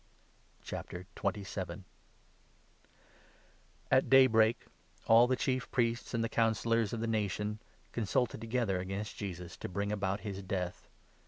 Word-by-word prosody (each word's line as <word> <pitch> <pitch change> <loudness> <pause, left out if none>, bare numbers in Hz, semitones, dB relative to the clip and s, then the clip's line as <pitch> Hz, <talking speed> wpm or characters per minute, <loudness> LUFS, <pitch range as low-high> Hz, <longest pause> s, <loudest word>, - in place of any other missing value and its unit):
The 90 +1 -6
End 100 0 -2
of 95 0 -4 2.1
At 130 0 +4
daybreak 120 -4 +5 0.4
all 115 +2 +7
the 130 - +2
Chief 130 0 -1
Priests 120 -2 0
and 115 - +1
the - - +1
Coun 115 0 +2
i - - 0
Judas. 110 - -7
cillors 115 -2 +2
of 115 - -2
the - - 0
Nation 105 -1 -1 0.3
consulted 115 +1 0
together 115 -5 0
against 95 +3 -4
Jesus, 90 -3 -6
to - - -6
bring 100 +2 -2
about 100 -1 -1
his 100 -2 -5
death. 90 -2 -4
105 Hz, 145 wpm, -33 LUFS, 95-115 Hz, 2.1 s, all